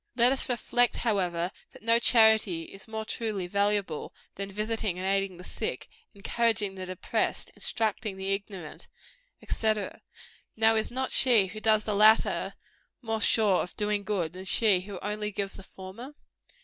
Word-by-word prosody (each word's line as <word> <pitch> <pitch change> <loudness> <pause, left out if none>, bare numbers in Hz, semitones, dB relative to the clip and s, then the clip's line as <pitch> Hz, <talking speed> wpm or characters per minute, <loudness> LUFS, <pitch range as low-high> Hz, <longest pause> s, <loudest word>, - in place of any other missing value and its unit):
Let 240 +1 +5
us 270 0 +1
reflect, 245 0 +1
however, 180 -6 0 0.2
that - - -15
no 230 +1 +4
charity 220 -8 +4
is 195 +3 -11
more 220 0 -5
truly 215 -5 -3
valuable, 200 -3 -1 0.2
than 200 0 -5
visiting 215 -2 -1
and 185 - -4
aiding 195 -2 0
the 180 - -11
sick, - - -5 0.3
encouraging 215 0 0
the 185 -1 -7
depressed, 185 -1 -2
instructing 215 -2 -2
the 190 +1 -1
ignorant, 195 -5 -7 0.6
&c. 220 -1 +1 0.8
Now 225 0 +4
is 220 - 0
not 260 +1 -3
she 235 -6 +5
who 215 +3 -7
does 215 -1 +3
the 215 - -2
latter, 215 +2 +3 0.5
more 225 -1 -2
sure 210 -6 +3
of 180 - -7
doing 210 -1 0
good 185 -6 -2
than 185 +1 -9
she 205 -1 +4
who 195 0 -8
only 210 +1 -2
gives 195 -1 -2
the - - -10
former? 195 +9 -11
210 Hz, 160 wpm, -28 LUFS, 190-220 Hz, 0.8 s, Let